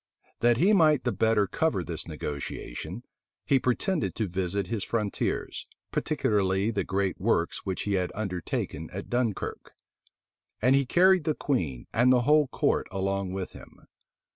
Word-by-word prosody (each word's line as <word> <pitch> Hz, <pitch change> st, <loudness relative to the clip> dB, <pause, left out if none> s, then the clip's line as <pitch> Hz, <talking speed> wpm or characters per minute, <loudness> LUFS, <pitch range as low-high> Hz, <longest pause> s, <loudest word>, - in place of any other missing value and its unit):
That 120 Hz, 0 st, +4 dB
he 190 Hz, -, +4 dB
might 155 Hz, -7 st, +4 dB
the 120 Hz, -, +1 dB
better 110 Hz, -3 st, +2 dB
cover 100 Hz, -, 0 dB
this 85 Hz, -1 st, -5 dB
negotiation, 75 Hz, -, -6 dB, 0.4 s
he 135 Hz, -, +3 dB
pretended 150 Hz, +8 st, 0 dB
to 110 Hz, -, -1 dB
visit 95 Hz, +2 st, -1 dB
his 105 Hz, +2 st, -2 dB
frontiers, 105 Hz, -3 st, -2 dB, 0.2 s
particularly 100 Hz, +1 st, +1 dB
the 100 Hz, -3 st, -1 dB
great 95 Hz, 0 st, -1 dB
works 95 Hz, -4 st, 0 dB
which 95 Hz, -, -2 dB
he 100 Hz, -, -1 dB
had 90 Hz, -2 st, 0 dB
undertaken 90 Hz, -5 st, -3 dB
at 100 Hz, -, -7 dB
Dunkirk: 120 Hz, -4 st, -2 dB, 0.9 s
and 125 Hz, +5 st, +4 dB
he 140 Hz, -1 st, +2 dB
carried 185 Hz, 0 st, +4 dB
the 155 Hz, -, +1 dB
queen 80 Hz, -, -2 dB
and 125 Hz, +2 st, +4 dB
the 125 Hz, -1 st, +5 dB
whole 150 Hz, +3 st, +4 dB
court -, -, 0 dB
along 95 Hz, -1 st, -2 dB
with 95 Hz, -1 st, -4 dB
him. -, -, -15 dB
105 Hz, 150 wpm, -28 LUFS, 95-125 Hz, 0.9 s, the